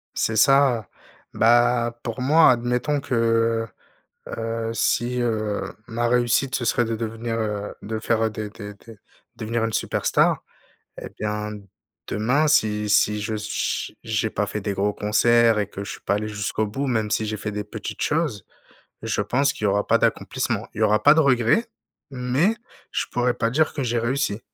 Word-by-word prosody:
C'est 110 Hz, -, 0 dB
ça, 125 Hz, -3 st, +4 dB, 0.5 s
bah, 120 Hz, 0 st, +3 dB
pour 115 Hz, +1 st, -4 dB
moi 150 Hz, +2 st, +6 dB
admettons 125 Hz, +4 st, 0 dB
que, 115 Hz, -2 st, +1 dB, 0.6 s
heu, 115 Hz, 0 st, -3 dB
si, 125 Hz, +1 st, 0 dB
heu, 110 Hz, -3 st, -1 dB, 0.3 s
ma 120 Hz, +1 st, -1 dB
réussite, 125 Hz, +2 st, +2 dB
ce 120 Hz, -, -2 dB
serait 120 Hz, +1 st, +2 dB
de 115 Hz, 0 st, -2 dB
devenir, 115 Hz, +1 st, -4 dB
heu, 105 Hz, -2 st, -3 dB
de 110 Hz, +1 st, -4 dB
faire 110 Hz, 0 st, +1 dB
des 105 Hz, -1 st, -6 dB
des 105 Hz, -1 st, -9 dB
des 110 Hz, +2 st, -15 dB, 0.4 s
devenir 115 Hz, +1 st, -2 dB
une 115 Hz, -, -3 dB
superstar -, -, +1 dB, 0.6 s
et -, -, -7 dB
bien, 105 Hz, 0 st, -3 dB, 0.6 s
demain 130 Hz, +9 st, +1 dB
si 105 Hz, -7 st, +2 dB
si 105 Hz, 0 st, +3 dB
je 110 Hz, +1 st, -3 dB
ch 105 Hz, 0 st, -3 dB
j'ai 110 Hz, -1 st, -1 dB
pas 105 Hz, -, -1 dB
fait 105 Hz, -, -4 dB
des 100 Hz, 0 st, -3 dB
gros 105 Hz, +2 st, 0 dB
concerts 115 Hz, +2 st, +3 dB
et 100 Hz, -1 st, -1 dB
que 100 Hz, 0 st, -7 dB
je -, -, -7 dB
suis -, -, -10 dB
pas 100 Hz, -, 0 dB
allé 105 Hz, +1 st, -2 dB
jusqu'au 105 Hz, +1 st, -2 dB
bout, 135 Hz, +7 st, -3 dB
même 110 Hz, -4 st, 0 dB
si 110 Hz, 0 st, +1 dB
j'ai 105 Hz, 0 st, -3 dB
fait 105 Hz, +1 st, -4 dB
des 105 Hz, 0 st, -4 dB
petites 105 Hz, -1 st, -6 dB
choses, 150 Hz, -, -1 dB, 0.6 s
je -, -, -1 dB
pense 140 Hz, +3 st, +1 dB
qu'il 105 Hz, -, -7 dB
y -, -, +4 dB
aura 100 Hz, +1 st, +1 dB
pas -, -, +4 dB
d'accomplissement. -, -, -1 dB
Il -, -, -9 dB
y -, -, +2 dB
aura 105 Hz, 0 st, +3 dB
pas 145 Hz, +1 st, +7 dB
de 160 Hz, -, +4 dB
regret 135 Hz, -, +3 dB, 0.4 s
mais 135 Hz, -, +1 dB, 0.3 s
je -, -, -1 dB
pourrais 125 Hz, 0 st, +1 dB
pas 115 Hz, -1 st, 0 dB
dire 155 Hz, +5 st, +1 dB
que 140 Hz, -, -2 dB
j'ai 120 Hz, -1 st, 0 dB
réussi. 115 Hz, -2 st, -1 dB
115 Hz, 180 wpm, -23 LUFS, 105-125 Hz, 0.6 s, pas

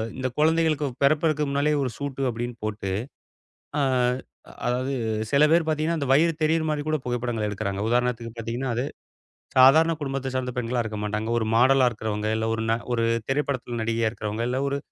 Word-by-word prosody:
இந்தக் 130 Hz, -1 st, -3 dB
குழந்தைகளுக்குப் 155 Hz, -4 st, +2 dB
பிறப்பதற்க்கு 155 Hz, +1 st, +3 dB
முன்னாலே 145 Hz, +2 st, +1 dB
ஒரு 130 Hz, -, -1 dB
சூட்டு 140 Hz, -1 st, -4 dB
அப்டின்னு 120 Hz, +1 st, -4 dB
போட்டு, 105 Hz, -3 st, -3 dB, 0.9 s
ஆ -, -, +2 dB, 0.9 s
அதாவது 130 Hz, +2 st, 0 dB, 0.4 s
சில 145 Hz, +2 st, +5 dB
பேர் 165 Hz, -1 st, +4 dB
பாத்தீங்கன்னா 155 Hz, +2 st, 0 dB
அந்த 140 Hz, -, -2 dB
வயிறு 165 Hz, +4 st, +4 dB
தெரியுற 160 Hz, +1 st, +2 dB
மாரி 150 Hz, -1 st, -1 dB
கூடப் 155 Hz, -3 st, -1 dB
புகைப்படங்கள் 120 Hz, -3 st, -1 dB
எடுக்கிறாங்க. 100 Hz, -1 st, -3 dB
உதாரணத்துக்குப் 120 Hz, -1 st, 0 dB
பாத்தீங்கன்னா, 120 Hz, +3 st, -3 dB
அது 125 Hz, +3 st, -1 dB, 0.7 s
சாதாரண 160 Hz, +6 st, +7 dB
குடும்பத்தைச் 135 Hz, -2 st, -3 dB
சார்ந்த 125 Hz, -1 st, -1 dB
பெண்களா 120 Hz, 0 st, 0 dB
இருக்க 110 Hz, -1 st, -5 dB
மாட்டாங்க. 105 Hz, +2 st, -2 dB
ஒரு 110 Hz, -, 0 dB
மாடலா 130 Hz, +1 st, +5 dB
இருக்குறவங்க 110 Hz, -1 st, -3 dB
இல்ல 110 Hz, 0 st, -1 dB
ஒரு 110 Hz, -, -2 dB
ந -, -, +4 dB, 0.2 s
ஒரு 115 Hz, -1 st, +1 dB, 0.2 s
திரைப்படத்துல 135 Hz, -4 st, -2 dB
நடிகையா 115 Hz, 0 st, +1 dB
இருக்கறவங்க 110 Hz, 0 st, -4 dB
இல்ல 130 Hz, +1 st, -1 dB
ஒரு 140 Hz, 0 st, -1 dB
125 Hz, 165 wpm, -25 LUFS, 115-145 Hz, 0.9 s, சாதாரண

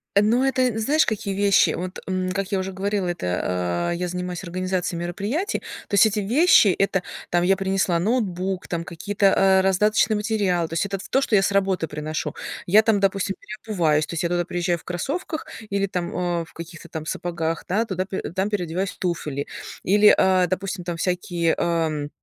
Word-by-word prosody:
Э, 200 Hz, -, +6 dB
ну, 235 Hz, +5 st, +3 dB
это, 265 Hz, -1 st, +1 dB
э, 250 Hz, -3 st, +1 dB
знаешь, 285 Hz, +8 st, +3 dB
какие 200 Hz, -2 st, -2 dB
вещи? 200 Hz, 0 st, +4 dB
Вот, 185 Hz, +1 st, -5 dB
м, 185 Hz, -1 st, -1 dB
как 195 Hz, +2 st, -3 dB
я 195 Hz, -, +1 dB
уже 190 Hz, +1 st, -3 dB
говорила, 195 Hz, 0 st, -1 dB
это, 90 Hz, -, -2 dB, 0.5 s
а, -, -, -1 dB
я 180 Hz, +1 st, -2 dB
занимаюсь 180 Hz, 0 st, -4 dB
организацией 180 Hz, -1 st, -2 dB
мероприятий. 205 Hz, -, -2 dB, 0.3 s
То 200 Hz, -, -1 dB
есть 205 Hz, -, +7 dB
эти 215 Hz, -1 st, +1 dB
вещи- 240 Hz, -, +5 dB
это 195 Hz, -2 st, +2 dB, 0.3 s
там 175 Hz, 0 st, +2 dB
я 190 Hz, +1 st, +3 dB
принесла 190 Hz, -2 st, +1 dB
ноутбук, 190 Hz, -3 st, -1 dB
там 170 Hz, -1 st, -3 dB
какие-то, 200 Hz, +5 st, -2 dB
э, 190 Hz, 0 st, +5 dB
раздаточные 210 Hz, +3 st, +3 dB
материалы. 200 Hz, -6 st, 0 dB
То 165 Hz, -, -9 dB
есть 170 Hz, -, +1 dB
это 195 Hz, 0 st, -3 dB
ф 190 Hz, -, -10 dB
то, 270 Hz, -, +2 dB
что 220 Hz, -, +1 dB
я 195 Hz, -, +5 dB
с 195 Hz, -, +1 dB
работы 190 Hz, -4 st, +1 dB
приношу. 150 Hz, 0 st, -4 dB, 0.3 s
Я 210 Hz, +5 st, +6 dB
там, 220 Hz, -2 st, +3 dB
допустим, 195 Hz, 0 st, 0 dB
переобуваюсь, 175 Hz, -8 st, 0 dB
то -, -, -8 dB
есть 170 Hz, -, -2 dB
я 170 Hz, -, 0 dB
туда 175 Hz, -1 st, 0 dB
приезжаю 175 Hz, 0 st, -1 dB
в 160 Hz, -, -17 dB
кроссовках 285 Hz, -, -4 dB, 0.2 s
или 200 Hz, 0 st, +1 dB
там, 180 Hz, -2 st, -3 dB
э, 175 Hz, -2 st, -1 dB
в -, -, -20 dB
каких-то 170 Hz, 0 st, -10 dB
там 155 Hz, -1 st, -6 dB
сапогах, 165 Hz, 0 st, -3 dB
да, 210 Hz, +5 st, +1 dB
туда 190 Hz, -2 st, -2 dB
э, 190 Hz, -, -4 dB
там 190 Hz, +3 st, -1 dB
переодеваюсь 190 Hz, -1 st, -2 dB
в -, -, -17 dB
туфли. 150 Hz, -6 st, -2 dB, 0.4 s
Или, 205 Hz, +2 st, +6 dB
а, 185 Hz, -1 st, +4 dB
допустим, 185 Hz, +1 st, -3 dB
там 175 Hz, -1 st, -4 dB
всякие, 175 Hz, -1 st, 0 dB
ам, 160 Hz, -4 st, 0 dB
185 Hz, 200 wpm, -23 LUFS, 175-200 Hz, 0.5 s, есть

